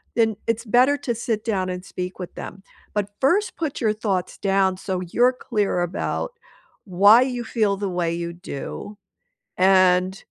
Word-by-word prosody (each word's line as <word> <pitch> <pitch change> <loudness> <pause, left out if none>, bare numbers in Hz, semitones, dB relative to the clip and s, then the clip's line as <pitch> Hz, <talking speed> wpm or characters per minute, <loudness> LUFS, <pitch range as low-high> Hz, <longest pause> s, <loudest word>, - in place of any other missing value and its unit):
then 225 -2 +2
it's 230 +1 -1
better 250 +6 +4
to 240 -4 -3
sit 225 -2 -2
down 190 -4 -1
and 180 0 -5
speak 180 +1 -6
with 180 - -7
them. 190 - -8 0.3
But 205 -1 -1
first, 365 +10 +2
put 315 -4 -3
your 215 -2 +2
thoughts 195 -4 -2
down 195 -1 +2
so 185 -1 -3
you're 240 +8 +3
clear 210 -7 -1
about 175 - -2 0.5
why 200 +5 +6
you 250 -2 -1
feel 210 -4 0
the 200 -1 -2
way 175 -2 -1
you 170 0 -4
do, 180 +4 -7 0.6
and 185 0 +4
200 Hz, 165 wpm, -23 LUFS, 185-230 Hz, 0.6 s, why